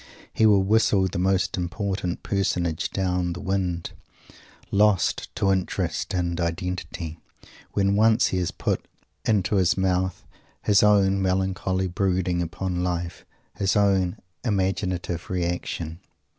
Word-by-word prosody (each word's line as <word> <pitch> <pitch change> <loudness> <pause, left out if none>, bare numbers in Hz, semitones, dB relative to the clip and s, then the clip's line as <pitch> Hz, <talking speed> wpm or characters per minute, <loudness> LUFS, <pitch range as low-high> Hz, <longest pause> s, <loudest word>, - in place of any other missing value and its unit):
He 110 - +4
will 100 -2 +5
whistle 100 -2 +3
the 90 - -3
most 95 0 +1
important 95 -1 -3
personage 90 -5 0
down 90 -2 -1
the 90 - -7
wind, 90 -3 -2 0.8
lost 100 -3 +2
to 95 - +2
interest 95 -1 -1
and 85 -1 -1
identity, 85 -1 -4 0.5
when 100 0 +2
once 110 +1 +4
he 95 - 0
has 90 - 0
put - - -2 0.4
into 105 -2 +2
his 95 -1 +3
mouth 95 -2 0 0.4
his 105 0 +4
own 100 -2 +4
melancholy 95 0 0
brooding 90 -1 0
upon 90 +1 -2
life 90 -1 -3 0.3
his 95 -2 0
own 95 -3 +2 0.3
imaginative 95 -5 -1
reaction. 85 -2 -3
95 Hz, 120 wpm, -25 LUFS, 90-100 Hz, 0.8 s, will